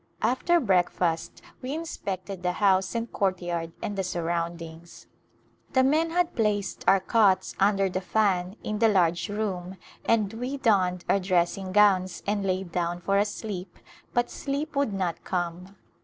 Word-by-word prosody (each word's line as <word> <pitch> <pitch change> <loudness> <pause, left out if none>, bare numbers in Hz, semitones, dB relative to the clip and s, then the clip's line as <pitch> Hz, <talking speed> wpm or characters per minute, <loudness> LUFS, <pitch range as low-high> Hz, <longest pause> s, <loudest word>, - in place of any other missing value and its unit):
After 345 +7 +3
breakfast 180 - 0 0.2
we 260 +3 -3
inspected 195 - -5
the 180 0 0
house 190 0 +2
and 230 0 -3
courtyard 175 -4 -1
and 205 - -3
the 195 - -1
surround 170 -1 -2
ings. 165 +1 -11 0.7
The 260 - +4
men 310 +5 +3
had 350 +1 +1
placed 205 -4 0
our 195 - +6
cots 200 -1 +2
under 195 0 +3
the 185 0 -3
fan 190 -2 +1
in 215 -1 -3
the 225 - +5
large 175 -4 +2
room, 190 -3 -3 0.3
and 215 -3 +1
we 250 +5 -4
donned 185 -8 +2
our 200 - +3
dressing 185 0 0
gowns 190 -3 +3
and 205 0 0
lay 190 0 0
down 175 -1 -2
for 195 +3 +1
a 205 - +3
sleep 200 -4 -6 0.3
but 240 0 0
sleep 290 +2 -3
would 280 -5 +1
not 185 -4 -2
come. 180 +2 -3
195 Hz, 155 wpm, -27 LUFS, 180-220 Hz, 0.7 s, our